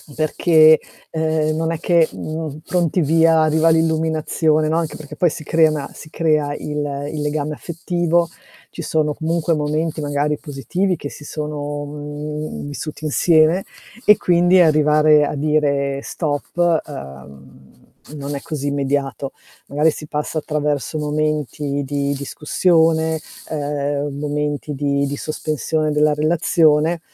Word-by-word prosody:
perché, 155 0 +5 0.3
uhm, 155 -1 0
non 165 +1 -1
è 165 - -3
che, 170 -1 +3
mhmm, 155 -1 -5
pronti 175 -1 0
via, 160 +1 +4
arriva 155 +1 +3
l'illuminazione, 160 -1 +1
no, 160 +1 +1
anche 165 -2 -2
perché 150 -2 -10
poi 175 -4 +2
si - - -7
crea 160 0 +3
una 145 -2 -4
si 155 - -12
crea 155 -3 +1
il 145 -1 -4
il 150 -1 -4
legame 150 0 -2
affettivo, 170 0 -1 0.4
ci 170 - -7
sono 150 -1 0
comunque 165 0 0
momenti 155 +2 -1
magari 145 0 0
positivi 165 - -2
che 145 -3 -6
si 150 - -11
sono, 145 -1 -4
mhmm, 150 +1 -6
vissuti 155 +2 -6
insieme 160 +4 +3 0.4
e 210 - +8
quindi 175 +1 +4
arrivare 150 -2 +5
a - - -3
dire 140 -2 0
stop, 165 +2 0
uhm, 70 - -12 0.3
non 145 0 -5
è 140 - -5
così 145 -3 -4
immediato. 140 -1 -1 0.4
Magari 150 +3 +2
si 150 - -8
passa 150 +1 -2
attraverso 150 0 -2
momenti 150 -1 -1
di 140 0 -1
discussione, 160 +3 +1 0.3
uhm, 145 -1 -2
momenti 150 0 -2
di 140 0 0
di 140 - -3
sospensione 155 0 -2
della 150 0 +3
relazione, 155 +1 +2
150 Hz, 135 wpm, -20 LUFS, 145-160 Hz, 0.4 s, e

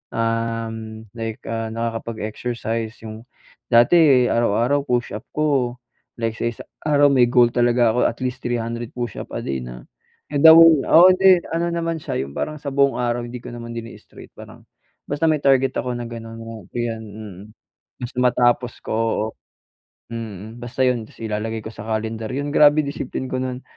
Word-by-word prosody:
uhm, 115 -1 -3
like, 115 +1 -5
ah, 115 0 -3
nakakapag-exercise. 115 0 -4
Yung 110 +1 -9 0.4
dati, 130 +2 +5
araw-araw 120 +5 +2
push-up 120 -5 -2
ko 140 -5 +1 0.5
like 115 0 -2
sa - - -3
isang 115 - -10 0.2
araw, 145 -1 +4
may 130 -3 +5
goal 120 -1 +4
talaga 120 -1 +3
ako - - +1
at 115 - -1
least 125 0 -3
300 120 -1 -3
push-up 120 -4 -5
a - - -3
day 70 - -2
na - - -10 0.5
down 160 +1 +8
oo, 170 +3 +8
hindi. 185 -1 +5
Ano 170 +1 0
naman 165 -1 -2
siya 145 - -3
yung 70 - -11
parang 155 - -3
sa 145 - -4
buong 140 0 +3
araw, 120 0 -1
hindi 125 +1 -7
ko 125 - -8
naman 115 0 -8
din 115 0 -6
straight, - - -15
parang - - -13 0.5
basta 145 +3 0
may 155 -1 +2
target 135 -1 +3
ako 125 - -2
na 120 - -5
gano'n, 115 -1 -8
oh, 115 -4 -9
ayan, 115 -2 -3
mm. 105 -3 -10 0.6
Basta 125 +1 -7
matapos 120 -1 +2
ko, - - -4
oo, 110 -1 0 0.9
mm, 110 -1 -7
basta 120 +2 -3
'yon. 120 -3 0
Ta's - - -20
ilalagay 110 +1 -3
ko 110 - -6
sa 105 0 -9
calendar 110 0 -3
yun, 145 +2 -3
grabe 150 +1 +6
discipline 135 -2 -5
ko 130 - -1
nun 130 0 -4
120 Hz, 170 wpm, -21 LUFS, 115-130 Hz, 0.9 s, down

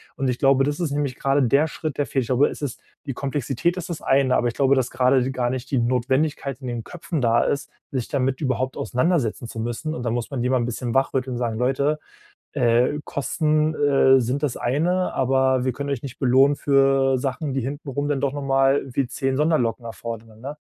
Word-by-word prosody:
Und 135 -1 -1
ich 125 - -2
glaube, 135 -1 +4
das 145 +3 -1
ist 170 -4 -1
nämlich 140 -3 -1
gerade 140 +1 +2
der 140 +6 +3
Schritt, 155 -2 -5
der 145 - +2
fehlt. 135 - 0
Ich - - -9
glaube, 130 +3 +4
es - - -9
ist 135 -4 -4 0.2
die 135 - -3
Komplexität 140 +5 -1
ist 180 - -5
das 170 - -5
eine, 135 -1 +3
aber 120 - +2
ich 120 - -2
glaube, 135 -1 +3
dass 130 -2 0
gerade 130 0 +2
gar 125 -2 -1
die 130 - -1
nicht 130 +1 -10
die 135 - +2
Notwendigkeit 130 +3 0
in 130 - -6
den 120 -2 -4
Köpfen 170 -2 -4
da 115 -1 +3
ist, 140 - -2 0.2
sich 130 -4 -2
damit 135 -2 -1
überhaupt 130 -1 -1
auseinandersetzen 125 -4 0
zu 115 - -7
müssen 120 +7 -3
und 125 - -5
da 120 - -1
muss 120 0 -2
man 135 -3 -2
die 125 - 0
mal 130 - +3
'n - - 0
bisschen 120 0 -3
wach 135 0 +2
rütteln 130 -1 -1
und - - -3
sagen: 115 -3 -2
„Leute, 140 +4 +1 0.5
äh, 125 +1 +2
Kosten, 155 +2 0
äh, 135 -2 +4
sind 125 +4 -2
das 140 -5 0
eine, 175 +9 0
aber 130 -1 +2
wir 130 - +1
können 140 +3 -5
euch 140 -4 -3
nicht 130 -3 -8
belohnen 135 +2 +4
für 135 -1 +3
Sachen, 135 +2 -3
die 135 - 0
hinten 140 +4 -5
rum 145 +2 -2
dann 145 -2 -1
doch 140 -1 +1
nochmal 135 -1 +2
wie 135 0 0
10 135 +1 -2
Sonderlocken 130 -7 +1
erfordern, 115 -1 -8
ne?“ 140 +5 -6
135 Hz, 230 wpm, -23 LUFS, 125-145 Hz, 0.5 s, glaube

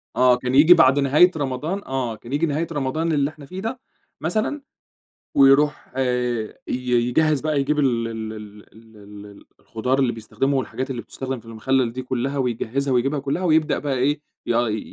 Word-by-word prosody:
آه، 125 -1 +5
كان 125 +1 -2
ييجي 155 +5 +8
بعد 135 -3 +5
نهاية 145 +6 +5
رمضان 150 +7 -3
آه، 130 -4 -3
كان 120 +3 -13
ييجي 150 +3 +2
نهاية 160 +2 -1
رمضان 155 +3 -1
اللي 145 -2 +1
إحنا 150 -2 -13
فيه 185 +7 -8
ده 230 +4 -4 0.4
مثلًا، 215 - -1 0.8
ويروح 140 +1 +4
ي 125 -3 -1 0.6
يجهّز 155 +2 +2
بقى 155 -1 0
يجيب 150 +2 0
ال 120 -5 +1
ال 110 -1 -5
ال 105 -1 -11
ال 110 0 -18 0.3
ال 100 -1 -15 0.2
الخضار 125 +4 -2
اللي 130 -3 +2
بيستخدمه 115 +5 -2
والحاجات 130 +2 -3
اللي 120 -3 -4
بتُستخدم 130 -2 -6
في 115 - -21
المخلل 115 +2 0
دي 130 +2 -5
كلّها، 130 +2 -2
ويجهّزها 130 +2 -1
ويجيبها 135 +4 +1
كلّها، 140 +7 -2
ويبدأ 160 -2 +2
بقى 145 -2 -2
إيه، 145 +4 +1 0.3
يا 120 0 +1
ي 110 0 -1
135 Hz, 175 wpm, -22 LUFS, 120-150 Hz, 0.8 s, ييجي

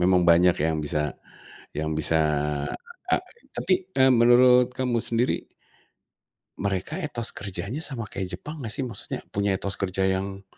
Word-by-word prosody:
Memang 90 0 +4
banyak 85 +1 +5
yang 80 0 +1
bisa 75 +1 -1 0.8
yang 80 0 -1
bisa 80 +2 +2 1.0
e - - +6 0.4
tapi, 190 - +1 0.2
eee, 130 0 +6
menurut 125 +1 +6
kamu 125 -2 0
sendiri 120 +1 +1 1.3
mereka 100 - -2
etos 120 -9 -3
kerjanya 100 - -4
sama 130 -7 -4
kayak 95 -2 -5
Jepang 150 +1 -8
nggak 115 -4 -3
sih, 135 - -2
maksudnya, 120 - -5
punya 100 -1 +1
etos 100 0 -3
kerja 95 -1 0
yang, 95 +1 -1
100 Hz, 140 wpm, -25 LUFS, 95-125 Hz, 1.3 s, e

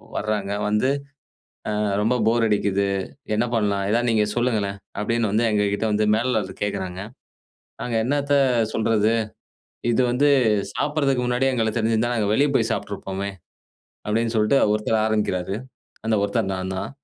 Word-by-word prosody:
வர்றாங்க. 105 -2 -2 0.2
வந்து, 105 +5 +2 0.8
அ - - -1 0.3
"ரொம்ப 115 +4 +2
போர் 115 0 +3
அடிக்குது. 100 -2 +1 0.5
என்ன 115 +3 +1
பண்ணலாம்? 100 -3 0
எதாவது 120 +2 +2
நீங்க 110 -2 +3
சொல்லுங்களேன்" 110 -5 0 0.2
அப்டின்னு 115 -1 0
வந்து, 115 +2 +2
எங்ககிட்ட 105 0 0
வந்து 105 0 +1
மேலாளர் 110 -5 -1
கேட்குறாங்க. 95 -3 -3 0.8
நாங்க, 120 -2 -3
"என்னாத்த 145 +2 0 0.4
சொல்றது? 110 0 +2 0.8
இது 130 - +3
வந்து, 140 +4 +3 0.5
சாப்பிடறதுக்கு 140 -4 0
முன்னாடியே 125 +2 +1
எங்களுக்கு 110 -1 0
தெரிஞ்சிருந்தா, 115 +2 +1
நாங்க 105 -2 0
வெளிய 145 +4 +3
போய் 115 0 +1
சாப்ட்டுருப்போமே!" 100 -2 -4 0.8
அப்டின்னு 115 +2 0
சொல்ட்டு 105 +6 +3 0.2
1த்தர் 110 +1 +1
ஆரம்பிக்கிறாரு. 100 -4 -1 0.5
அந்த 110 0 +2
1த்தர் 100 -1 0
நான்தான். 95 0 -4
110 Hz, 130 wpm, -23 LUFS, 100-120 Hz, 0.8 s, போர்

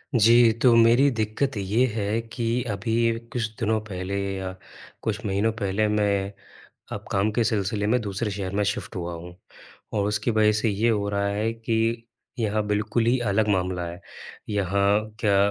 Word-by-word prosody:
जी, 115 +1 +6
तो 125 -2 +6
मेरी 115 +4 +6
दिक़्क़त 110 +5 -1
ये 105 +6 +2
है 105 0 -1
कि 120 0 -1
अभी 115 +3 0
कुछ 120 -2 0
दिनों 110 0 +1
पहले 95 0 -4 0.2
या 95 -1 -4 0.5
कुछ 110 +1 -3
महीनों 100 +3 +1
पहले 100 +1 +1
मैं 100 -2 +1 0.6
अब - - -5
काम 100 +2 +2
के 115 +2 +1
सिलसिले 105 -2 0
में 125 +4 +2
दूसरे 105 +1 -3
शहर 95 -2 -4
में 105 - +2
शिफ्ट 105 +1 -3
हुआ 85 -1 -4
हूँ 90 +1 -10 0.6
और 100 -1 0
उसकी 105 +3 0
वजह 110 -1 +4
से 115 - +2
ये 105 +3 +1
हो 105 -3 +1
रहा 100 0 0
है 105 +3 -1
कि 115 0 -1 0.3
यहाँ 110 -2 0
बिल्कुल 105 +2 0
ही 125 +2 +3
अलग 110 +1 +2
मामला 90 -3 0
है। 85 +2 -8 0.5
यहाँ 100 0 +2 0.2
क्या 100 -2 +3
105 Hz, 170 wpm, -25 LUFS, 100-115 Hz, 0.6 s, जी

